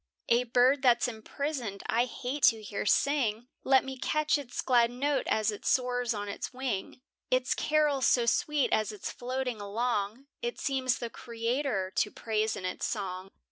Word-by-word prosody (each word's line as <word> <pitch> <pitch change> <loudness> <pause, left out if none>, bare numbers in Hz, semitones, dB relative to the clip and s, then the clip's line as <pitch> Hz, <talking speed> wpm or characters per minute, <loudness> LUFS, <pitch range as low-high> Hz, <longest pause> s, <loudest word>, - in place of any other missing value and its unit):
A 240 +1 +4
bird 250 +3 +4
that's 245 -3 +4
imprisoned, 240 -2 -4
I 235 +2 +2
hate 255 +3 -5
to 225 -3 +4
hear 210 0 -4
sing, 245 -4 +1
Let 265 0 +4
me 265 -1 -6
catch 305 +3 +1
its 250 -4 -8
glad 240 -2 +4
note 275 +4 -1
as 215 0 +2
it 205 - -8
soars 245 -1 +1
on 205 0 -3
the 200 - -7
wing; 255 -3 -4 0.3
Its 255 0 +2
carol 300 -3 +1
so 245 -1 +4
sweet 290 +4 +1
as 215 0 +1
it's 210 - -6
floating 250 -2 -3
along, 215 +3 -2 0.2
It 475 0 -3
seems 260 -3 0
the 235 -1 -5
Creator 230 -4 -2
to 210 - +2
praise 220 0 -1
in 185 - -6
its 185 - -2
song. 190 -3 -4
245 Hz, 170 wpm, -30 LUFS, 215-265 Hz, 0.3 s, A